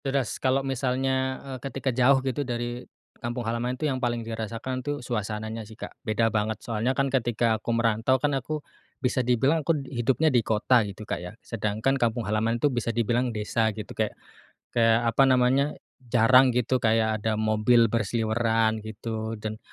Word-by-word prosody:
Deras, 135 -3 -1
kalau 135 +1 +1
misalnya, 130 0 0
eee, 135 -1 -6
ketika 135 0 -3
jauh 130 +2 +4
gitu 130 +1 -1
dari 120 -2 -3 0.4
kampung 120 0 -3
halaman 120 +3 -2
itu 155 - -3
yang 130 -3 -1
paling 120 -2 -1
dirasakan, 115 +3 -4
tuh, 145 +2 -3
suasananya, 110 -1 -3
sih, 110 0 -12
Kak. - - -8
Beda 115 +1 0
banget, 110 0 0
soalnya, 115 +3 -1
kan, 140 - +3
ketika 120 -3 +1
aku - - -6
merantau, 115 +2 +2
kan, 145 +2 0
aku 145 +3 -3 0.3
bisa 130 0 0
dibilang 130 +6 +2
aku 155 +2 +1
hidupnya 135 +4 +1
di 120 - +4
kota 115 +3 +3
gitu, 100 +2 -9
Kak, - - -3
ya. 90 - -7
Sedangkan 115 +5 -1
kampung 120 -1 0
halaman 110 +3 0
itu 140 +3 +1
bisa 120 -1 -1
dibilang 120 +2 +1
desa 110 +1 0
gitu, 105 - -7
kayak - - 0 0.6
kayak 115 0 +3
apa 135 - +4
namanya, 130 +3 +3 0.3
jarang 125 +1 +5
gitu 125 +1 +1
kayak 110 -1 +2
ada 110 +1 0
mobil 110 +1 +3
berseliweran 115 0 +1
gitu. 110 +1 -5
Dan 110 0 -6
120 Hz, 170 wpm, -26 LUFS, 110-130 Hz, 0.6 s, jarang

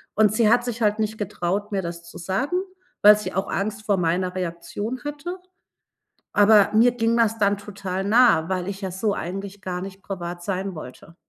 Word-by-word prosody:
Und 215 -2 +4
sie 215 0 +3
hat 240 +1 +4
sich 240 -1 -4
halt 210 0 +2
nicht 220 0 -1
getraut, 200 +1 -2
mir 195 -2 0
das 170 -1 -6
zu 170 - -12
sagen, 195 - -1 0.4
weil 210 0 +8
sie 210 - -5
auch 190 +2 -2
Angst 215 +2 -3
vor 200 -2 +3
meiner 180 +1 0
Reaktion 185 +7 -4
hatte. 295 +5 -5 1.0
Aber 205 0 +6
mir 230 +3 +5
ging 230 -1 +1
das 225 -1 +2
dann 200 -1 +3
total 195 -2 -5
nah, 215 -7 +5
weil 185 -1 -2
ich 195 -1 -5
ja 190 - -3
so 200 +3 -1
eigentlich 195 +3 -6
gar 180 -2 -4
nicht 195 0 -8
privat 175 -3 -6
sein 195 0 -3
wollte. 155 +3 -11
200 Hz, 190 wpm, -23 LUFS, 185-220 Hz, 1.0 s, weil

